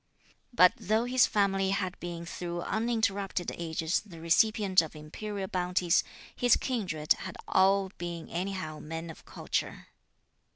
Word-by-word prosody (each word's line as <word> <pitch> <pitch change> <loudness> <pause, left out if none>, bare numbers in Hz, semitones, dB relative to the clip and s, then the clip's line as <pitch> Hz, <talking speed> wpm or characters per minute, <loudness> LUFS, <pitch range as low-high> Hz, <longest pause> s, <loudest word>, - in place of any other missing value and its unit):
But 180 -7 +6
though 220 +4 +1
his 250 0 +4
family 195 -2 +1
had 195 -2 -2
been 170 -1 -6
through 175 0 -5
uninterrupted 205 -4 -1
ages 165 0 -1
the 175 -6 -12
recipient 195 +2 +3
of 160 -1 -8
imperial 190 +6 -5
bounties, 180 -1 +1 0.3
his 245 -1 +4
kindred 185 - 0
had - - -8
all 195 +1 +3
been 170 -2 -5
anyhow 175 -3 -4
men 165 +1 -6
of - - -15
culture. - - -4
185 Hz, 130 wpm, -30 LUFS, 170-205 Hz, 0.3 s, But